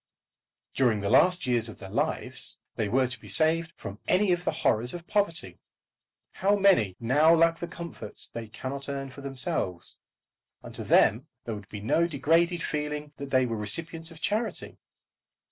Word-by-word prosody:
During 120 Hz, -6 st, +2 dB
the 100 Hz, -, -1 dB
last 180 Hz, 0 st, +4 dB
years 120 Hz, -3 st, +1 dB
of 110 Hz, -, -10 dB
their 95 Hz, -, -10 dB
lives -, -, +2 dB, 0.2 s
they 110 Hz, -3 st, -1 dB
were 130 Hz, +4 st, +3 dB
to 125 Hz, -2 st, -5 dB
be 105 Hz, -, -11 dB
saved 160 Hz, -, +2 dB
from 100 Hz, -1 st, -8 dB
any 195 Hz, +1 st, +3 dB
of 175 Hz, 0 st, 0 dB
the -, -, +2 dB
horrors 120 Hz, +5 st, +1 dB
of 170 Hz, -1 st, -8 dB
poverty. 200 Hz, -2 st, -1 dB, 0.7 s
How 200 Hz, +2 st, +2 dB
many 190 Hz, -, +3 dB
now 145 Hz, +7 st, +4 dB
lack 165 Hz, 0 st, +3 dB
the 170 Hz, -, -4 dB
comforts 170 Hz, -13 st, -5 dB
they 115 Hz, -1 st, -7 dB
cannot 135 Hz, +6 st, -5 dB
earn 135 Hz, -1 st, -4 dB
for 140 Hz, -, -11 dB
themselves? 125 Hz, -10 st, -3 dB, 0.7 s
And -, -, -10 dB
to -, -, -5 dB
them -, -, +3 dB, 0.2 s
there 115 Hz, -, -3 dB
would 105 Hz, 0 st, -9 dB
be 105 Hz, -2 st, -7 dB
no 165 Hz, +10 st, +2 dB
degraded 165 Hz, +3 st, +1 dB
feeling 150 Hz, 0 st, -3 dB
that 140 Hz, -1 st, -7 dB
they 130 Hz, -1 st, +3 dB
were 115 Hz, -2 st, -3 dB
the -, -, -4 dB
recipients 165 Hz, +9 st, -2 dB
of 165 Hz, -2 st, -13 dB
charity. 215 Hz, +6 st, -2 dB
140 Hz, 180 wpm, -27 LUFS, 115-170 Hz, 0.7 s, last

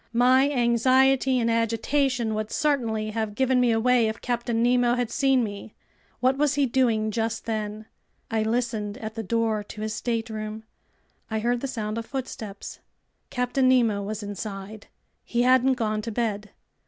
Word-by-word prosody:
My 255 Hz, +3 st, +4 dB
anxiety 260 Hz, +1 st, +3 dB
and 230 Hz, -, +1 dB
agitation 230 Hz, +1 st, 0 dB
would 215 Hz, 0 st, -3 dB
certainly 230 Hz, -8 st, 0 dB
have 220 Hz, -1 st, -3 dB
given 260 Hz, +1 st, +2 dB
me 245 Hz, -, +3 dB
away 235 Hz, +1 st, +3 dB
if 220 Hz, +1 st, -4 dB
Captain 235 Hz, -1 st, -1 dB
Nemo 245 Hz, 0 st, +3 dB
had 245 Hz, -2 st, -2 dB
seen 270 Hz, -4 st, +2 dB
me. 205 Hz, 0 st, -7 dB, 0.5 s
What 260 Hz, +1 st, +3 dB
was 295 Hz, -1 st, +2 dB
he 285 Hz, -1 st, +3 dB
doing 230 Hz, -4 st, +1 dB
just 225 Hz, +1 st, -2 dB
then? 215 Hz, -1 st, -3 dB, 0.5 s
I 225 Hz, -1 st, +1 dB
listened 220 Hz, -2 st, -1 dB
at 220 Hz, -4 st, -6 dB
the 225 Hz, -, -4 dB
door 225 Hz, 0 st, 0 dB
to 210 Hz, -, -9 dB
his 215 Hz, 0 st, -2 dB
stateroom. 220 Hz, -2 st, -3 dB, 0.7 s
I 220 Hz, -, -1 dB
heard 240 Hz, +2 st, 0 dB
the 275 Hz, -, -2 dB
sound 220 Hz, -3 st, -3 dB
of 230 Hz, -, -7 dB
footsteps. 225 Hz, -7 st, -6 dB, 0.5 s
Captain 250 Hz, +1 st, +1 dB
Nemo 230 Hz, -5 st, +3 dB
was 210 Hz, +1 st, -5 dB
inside. 205 Hz, 0 st, -7 dB, 0.4 s
He 240 Hz, 0 st, 0 dB
hadn't 255 Hz, +1 st, +4 dB
gone 215 Hz, -3 st, -1 dB
to 230 Hz, -, -5 dB
bed. 210 Hz, -2 st, -2 dB
230 Hz, 160 wpm, -25 LUFS, 215-250 Hz, 0.7 s, My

